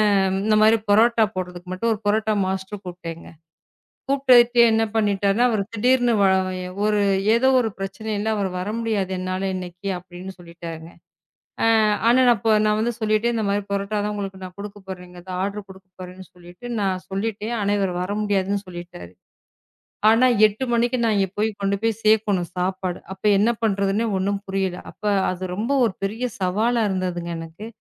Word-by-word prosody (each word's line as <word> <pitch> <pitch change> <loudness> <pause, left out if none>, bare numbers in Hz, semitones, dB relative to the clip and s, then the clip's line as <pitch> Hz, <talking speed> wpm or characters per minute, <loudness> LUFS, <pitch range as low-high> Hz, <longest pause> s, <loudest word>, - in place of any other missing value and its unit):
அ, - - +4 0.3
இந்த 215 0 +3
மாதிரி 220 +1 +5
புரோட்டா 225 +2 +5
போடுறதுக்கு 180 0 -6
மட்டும் 230 +5 0
ஒரு 210 - -8
புரோட்டா 215 +1 +1
மாஸ்டர் 190 +1 -4
கூப்பிட்டேங்க. 170 -2 -8 0.8
கூப்பிட்டுட்டு 250 -3 +5
என்ன 225 0 +2
பண்ணிட்டார்னா 205 0 +2
அவரு 220 -4 0
திடீர்னு 245 +2 +2 0.7
ஒரு 210 -1 +2 0.3
ஏதோ 235 +3 +3
ஒரு 225 - -1
பிரச்சனை 195 +3 -5
இல்ல 215 +2 -1
அவரு 200 -2 -1
வர 185 +3 -3
முடியாது 210 -5 -1
என்னால 185 +1 -2
இன்னைக்கு 180 +1 -6
அப்படின்னு 180 +1 -9
சொல்லிட்டாருங்க. 170 -1 -9 0.7
ஆ, - - +3 0.4
ஆனா 240 +2 +5 0.4
நான் 210 0 +2
வந்து 235 +2 0
சொல்லிட்டேன் 220 +2 +1
இந்த 225 - -1
மாரி 200 +1 0
பரோட்டா 200 +1 -2
தான் 210 - -2
உங்களுக்கு 195 -2 -5
நான் 185 -1 -8
கொடுக்கப்போறேங்கறதை 190 -3 -9
ஆர்டர் 200 +1 -4
கொடுக்கப்போறேன்னு 185 -1 -12
சொல்லிட்டு 175 +5 -13
நான் 190 -2 -1
சொல்லிட்டேன். 215 +3 -3
ஆனா 205 0 +1
அவரு 190 -2 0
வர 185 +3 -3
முடியாதுன்னு 200 -1 0
சொல்லிட்டாரு. 175 - -10 1.0
ஆனா 230 +3 +5 0.2
8:00 215 +5 -3
மணிக்கு 240 +2 +1
நான் 225 -2 +2
அங்க 195 -1 +2
போய்க் 215 -1 -1
கொண்டுபோய் 200 +3 0
சேர்க்கணும் 210 -5 +2
சாப்பாடு. 185 0 -2
அப்ப 190 - -29
என்ன 220 +4 +3
பண்றதுன்னே 200 +1 +1
ஒண்ணும் 200 +1 -1
புரியல. 190 -2 -2 0.2
அப்ப - - -20 0.3
அது 185 0 -5
ரொம்ப 225 +8 -2
ஒரு 205 - -3
பெரிய 220 +5 -3 0.2
சவாலா 220 +6 +1
இருந்ததுங்க 180 -2 -3
எனக்கு. 165 +6 -9
200 Hz, 155 wpm, -22 LUFS, 185-220 Hz, 1.0 s, மாதிரி